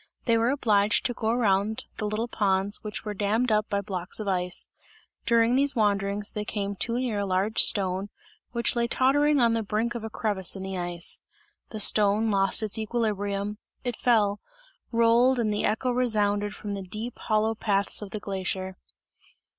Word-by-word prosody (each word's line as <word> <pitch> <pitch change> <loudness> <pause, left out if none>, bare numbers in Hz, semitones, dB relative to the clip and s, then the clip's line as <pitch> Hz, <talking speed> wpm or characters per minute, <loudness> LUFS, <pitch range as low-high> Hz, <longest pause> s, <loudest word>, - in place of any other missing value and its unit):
They 230 - +3
were 230 +1 +2
obliged 215 -7 +2
to 245 - +1
go 220 -2 -2
around 215 -2 +1
the 210 - -2
little 215 +3 -2
ponds 195 -2 0
which 215 +1 -5
were 210 - -3
dammed 215 +4 0
up 215 0 +1
by 200 0 0
blocks 185 -1 -5
of 215 - -4
ice; 180 -2 -1 0.6
during 235 0 +4
these 280 +2 +2
wanderings 205 -1 0
they 210 - -4
came 200 -1 -3
too 230 +5 -1
near 245 -5 -1
a 200 - -1
large 190 +4 +2
stone, 190 0 +1 0.4
which 235 0 +1
lay 235 0 +1
tottering 285 +4 +3
on 235 -2 +4
the 230 - 0
brink 220 +3 -1
of 235 -2 -5
a 220 - -4
crevice 205 -5 -1
in 190 - -6
the 190 0 -4
ice. 175 -1 -4 0.5
The 215 - -6
stone 210 +1 +4
lost 195 +2 +2
its 215 0 -4
equilibrium, 210 -2 -2 0.2
it 245 -2 -2
fell, 210 -4 +2 0.5
rolled 235 +2 +4
and 220 -3 0
the 210 - 0
echo 240 +4 0
resounded 210 -4 0
from 205 -1 -5
the 200 - -4
deep 215 +6 -6
hollow 215 +1 +1
paths 205 -2 -1
of 205 - -7
the 215 - -5
glacier. 190 -1 -4
210 Hz, 180 wpm, -26 LUFS, 200-230 Hz, 0.6 s, during